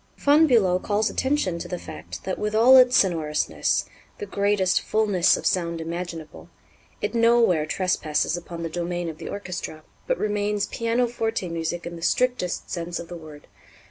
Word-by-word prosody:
Von 300 Hz, +3 st, +5 dB
Bülow 190 Hz, -8 st, +3 dB
calls 210 Hz, 0 st, 0 dB
attention 260 Hz, -11 st, 0 dB
to 175 Hz, -, -6 dB
the 180 Hz, 0 st, -4 dB
fact 85 Hz, -, -9 dB
that, 190 Hz, -, -3 dB
with 210 Hz, 0 st, -2 dB
all 240 Hz, +4 st, +7 dB
its 250 Hz, -1 st, +7 dB
sonorousness, 160 Hz, -5 st, +1 dB, 0.3 s
"the 425 Hz, -, -5 dB
greatest 200 Hz, -, +1 dB
fullness 205 Hz, -5 st, +2 dB
of -, -, -8 dB
sound 170 Hz, -2 st, 0 dB
imaginable," 165 Hz, -1 st, -6 dB, 0.5 s
it -, -, -2 dB
nowhere 230 Hz, -9 st, +3 dB
trespasses 165 Hz, -3 st, 0 dB
upon 170 Hz, -1 st, -7 dB
the -, -, -2 dB
domain 175 Hz, +1 st, -3 dB
of 155 Hz, -, -9 dB
the -, -, -7 dB
orchestra, 180 Hz, -5 st, -6 dB, 0.2 s
but -, -, +1 dB
remains 205 Hz, -1 st, -1 dB
pianoforte 230 Hz, -3 st, -1 dB
music 165 Hz, +1 st, -3 dB
in 170 Hz, 0 st, -6 dB
the -, -, -11 dB
strictest 245 Hz, -1 st, 0 dB
sense 170 Hz, 0 st, -4 dB
of 170 Hz, -, -8 dB
the 175 Hz, -, -7 dB
word. 155 Hz, -3 st, -12 dB
180 Hz, 165 wpm, -24 LUFS, 170-225 Hz, 0.5 s, all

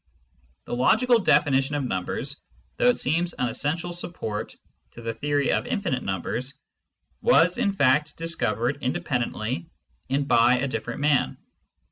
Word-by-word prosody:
The -, -, -6 dB
logical 230 Hz, -, +4 dB
definition 145 Hz, -6 st, +3 dB
of 145 Hz, -, -1 dB
numbers, 125 Hz, +6 st, -3 dB, 0.4 s
though -, -, +3 dB
it 245 Hz, -, +2 dB
seems 170 Hz, +4 st, 0 dB
an 125 Hz, -, -1 dB
essential 170 Hz, +7 st, -2 dB
support 140 Hz, -12 st, -5 dB, 0.4 s
to 120 Hz, -, -10 dB
the 115 Hz, 0 st, -2 dB
theory 145 Hz, +4 st, 0 dB
of -, -, 0 dB
infinite 200 Hz, -, -1 dB
numbers, 115 Hz, -, -3 dB, 0.7 s
was 485 Hz, -, +4 dB
in 215 Hz, -5 st, +2 dB
fact 150 Hz, -2 st, +2 dB
discovered 140 Hz, -6 st, -1 dB
independently 120 Hz, -, -2 dB, 0.4 s
and 140 Hz, +1 st, 0 dB
by 120 Hz, -1 st, +5 dB
a 135 Hz, +3 st, -1 dB
diflFerent 140 Hz, -, -4 dB
man. 145 Hz, -2 st, +2 dB
140 Hz, 135 wpm, -25 LUFS, 120-165 Hz, 0.7 s, by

